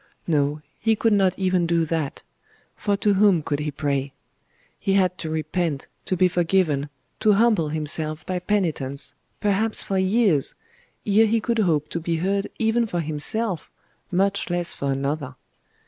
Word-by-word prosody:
No, 150 -1 0 0.2
he 225 0 +2
could 220 +1 +2
not 190 -2 +2
even 185 -2 +1
do 165 -1 +2
that; 160 -3 -3 0.5
for 205 -1 0
to 205 0 +2
whom 195 -5 +4
could 145 0 -2
he 150 0 -2
pray? 140 -1 -2 0.7
He 195 - 0
had 185 -2 +3
to 160 - -4
repent, 155 -1 -2 0.2
to 185 - -1
be 185 +1 +5
forgiven, 170 -5 +1 0.3
to 215 - +4
humble 210 -7 +3
himself 155 0 -1
by 185 -1 -2
penitence, 165 -8 -1 0.3
perhaps 210 +2 +2
for 195 -1 -1
years, 190 - +2 0.5
ere 215 +2 +4
he 225 +1 +2
could 230 +1 -1
hope 155 -7 +2
to 170 - -3
be 165 0 -1
heard 195 +4 0
even 230 +1 +1
for 175 -5 -2
himself, 165 +5 -2 0.4
much 195 +1 0
less 175 -1 0
for 140 -1 -2
another.... 140 0 -2
175 Hz, 160 wpm, -23 LUFS, 150-200 Hz, 0.7 s, be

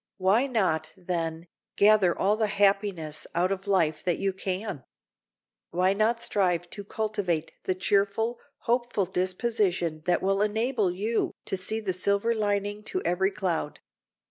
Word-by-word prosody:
Why 200 +7 +3
not, 170 - 0
then, 170 -2 -3 0.3
gather 205 -4 +5
all 205 +2 +2
the 215 0 +1
happiness 195 -6 0
out 180 +2 +2
of 195 0 -3
life 165 -6 +2
that 175 -2 +1
you 195 -1 -1
can? 190 - -4 0.9
Why 185 +2 +2
not 220 +3 +1
strive 180 -6 +1
to 205 - -5
cultivate 200 -6 -2
the 185 - 0
cheerful, 200 +5 +1 0.2
hopeful 240 -4 0
disposition 185 -3 -1
that 175 +1 +2
will 195 +1 +2
enable 220 0 +1
you 210 +6 -1
to - - -1
see 190 +4 -1
the 200 -4 -2
silver 200 +5 +1
lining 205 -1 -1
to 370 - -2
every 190 +2 +2
cloud? 180 -6 -2
195 Hz, 145 wpm, -27 LUFS, 180-215 Hz, 0.9 s, gather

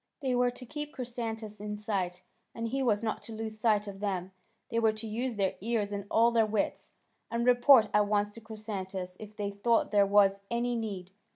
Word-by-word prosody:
They 265 -2 0
were 245 0 +3
to 245 +1 -7
keep 295 +3 -6
Chrysantas 225 -4 -5
in 210 0 -4
sight, 185 -4 -2 0.3
and 230 0 -3
he 270 +3 -1
was 225 -4 +2
not 220 - -2
to 225 - -8
lose 220 0 -5
sight 215 -2 +3
of 200 -1 -8
them; 190 -2 -2 0.4
they 230 - 0
were 220 -1 +3
to 215 +1 -7
use 235 +3 -2
their 195 -2 +1
ears 215 -2 -1
and 200 0 -4
all 230 +1 +4
their 230 -1 +4
wits, 210 -1 -1 0.4
and 235 0 -1
report 245 -1 +7
at 210 0 +4
once 205 0 +1
to 230 - -10
Chrysantas 195 -4 -5
if 215 -1 -10
they 205 -1 -2
thought 225 +3 +1
there 200 -1 +5
was 200 -1 +4
any 240 +1 0
need. 200 -5 -4
215 Hz, 205 wpm, -30 LUFS, 205-235 Hz, 0.4 s, report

